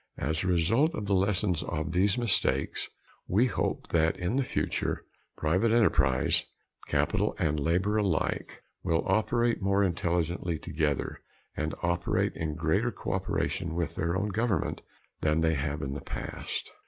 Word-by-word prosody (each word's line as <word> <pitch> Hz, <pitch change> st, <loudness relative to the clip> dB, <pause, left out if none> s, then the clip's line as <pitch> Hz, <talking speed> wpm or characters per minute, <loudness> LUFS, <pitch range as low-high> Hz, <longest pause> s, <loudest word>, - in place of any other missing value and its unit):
As 80 Hz, +4 st, -1 dB
a -, -, -1 dB
result 115 Hz, -, +3 dB
of 105 Hz, -, -3 dB
the 100 Hz, -, +1 dB
lessons 95 Hz, -2 st, +2 dB
of -, -, -5 dB
all 75 Hz, -, -1 dB
these 95 Hz, +7 st, +2 dB
mistakes 120 Hz, -6 st, +1 dB, 0.4 s
we 105 Hz, +7 st, +4 dB
hope 125 Hz, -, -2 dB
that 80 Hz, -1 st, +2 dB
in 90 Hz, +7 st, -1 dB
the 135 Hz, -, +2 dB
future -, -, -2 dB, 0.3 s
private 95 Hz, +9 st, +2 dB
enterprise 100 Hz, -, +3 dB, 0.4 s
capital -, -, +1 dB
and 75 Hz, -1 st, +1 dB
labor 90 Hz, +8 st, +1 dB
alike 100 Hz, -6 st, -1 dB, 0.2 s
will 85 Hz, -2 st, +1 dB
operate 115 Hz, +4 st, +2 dB
more 100 Hz, +1 st, +3 dB
intelligently 85 Hz, -1 st, 0 dB
together, 75 Hz, -3 st, -2 dB, 0.3 s
and 80 Hz, +1 st, -2 dB
operate 85 Hz, 0 st, +1 dB
in 80 Hz, -1 st, -3 dB
greater 80 Hz, 0 st, +1 dB
cooperation 80 Hz, -, -2 dB
with 85 Hz, -2 st, -1 dB
their 85 Hz, -1 st, -1 dB
own 105 Hz, +2 st, -1 dB
government 105 Hz, -3 st, 0 dB, 0.4 s
than 80 Hz, +1 st, +2 dB
they 80 Hz, 0 st, +3 dB
have 75 Hz, 0 st, -2 dB
in 70 Hz, 0 st, -3 dB
the 70 Hz, -, -5 dB
past. -, -, -5 dB
85 Hz, 150 wpm, -29 LUFS, 80-100 Hz, 0.4 s, we